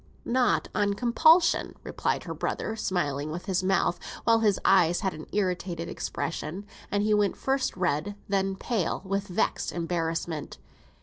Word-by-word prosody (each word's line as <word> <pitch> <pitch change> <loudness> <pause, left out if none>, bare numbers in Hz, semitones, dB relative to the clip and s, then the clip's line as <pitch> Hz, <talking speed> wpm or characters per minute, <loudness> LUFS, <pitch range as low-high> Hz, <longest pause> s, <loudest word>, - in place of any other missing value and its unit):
"Not 250 -1 +2
on 205 -1 +1
compulsion," 315 - +4
replied - - -1
her - - -5
brother, 220 - -3
smiling 150 -9 -1
with 170 +3 -5
his 190 -1 0
mouth, 185 -2 +2 0.2
while 230 -1 +4
his 210 -4 +2
eyes 175 -3 +4
had 190 -3 0
an 155 0 -9
irritated 180 -4 -1
expression, 170 +4 -4 0.2
and 205 0 +1
he 215 0 +2
went 205 -2 +2
first 270 -6 0
red, 180 +2 0
then 195 -1 0
pale, 190 -4 -2
with 195 +1 -1
vexed 180 - 0
embarrassment. 165 -2 -3
190 Hz, 145 wpm, -27 LUFS, 170-210 Hz, 0.2 s, compulsion